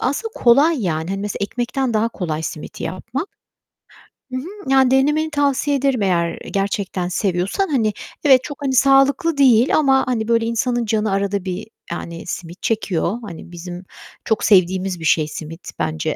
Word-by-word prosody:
aslında, 425 - -2
kolay, 275 +3 +4
yani, 160 -1 -2
hani, 195 0 -2
mesela, 205 0 -4
ekmekten 240 +4 -2
daha 215 +1 +2
kolay 160 -8 -4
simit 155 -1 -7
yapmak. 255 - -4 1.0
Hı 255 - -2
hı. 345 0 -6
Yani 265 -1 +5
denemeni 295 +4 +2
tavsiye 285 -1 +1
ederim 265 -4 +1
eğer 170 -3 0
gerçekten 195 -2 -1
seviyorsan. 190 - -1
Hani, 225 -7 +1 0.3
evet, 265 -3 +6
çok, 290 -1 -8
hani, 270 -1 0
sağlıklı 275 +4 +4
değil 255 -2 +5
ama, 270 -3 +3
hani, 225 -4 -1
böyle, 230 -1 +2
insanın 235 +1 0
canı 215 -1 0
arada 200 0 -1
bir, 185 +3 -4 0.2
yani, 170 0 -6
simit 175 0 -6
çekiyor. 205 -2 0
Hani, 175 -5 -9
bizim 175 +1 -8 0.4
çok 220 - 0
sevdiğimiz 185 -2 +3
bir 160 - -6
şey 155 -1 +3
simit 160 +3 -8
bence. 155 0 -1
220 Hz, 160 wpm, -20 LUFS, 180-265 Hz, 1.0 s, evet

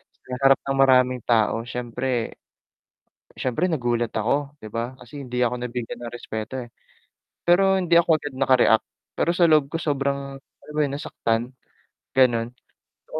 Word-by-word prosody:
sa - - -40 0.3
harap 135 - +5
ng 135 0 -2
maraming 130 -2 +4
tao. 115 0 +2
Siyempre 120 0 -3 1.0
siyempre 130 +8 0
nagulat 120 -5 0
ako, 140 +6 -1
'di 110 - -8
ba. 120 +2 -3
Kasi 130 +4 -10
hindi 125 0 -3
ako 120 +1 -1
nabigyan 125 -1 -5
ng 120 - -7
respeto, 110 +1 -5
eh. 120 - -10 0.8
Pero 190 +2 +4
hindi 170 -2 +1
ako 165 -2 +4
agad 145 -2 -6
naka-react, 130 -4 +4 0.3
pero - - +2
sa 175 - +5
loob 155 -3 +4
ko - - 0
sobrang, 140 -2 -2
alam 150 - -17
mo 150 - 0
'yun, 140 -2 -1
nasaktan, 120 -3 -2 0.6
ganun. 120 -2 +3 0.5
Gusto - - -26
130 Hz, 155 wpm, -24 LUFS, 120-145 Hz, 1.0 s, harap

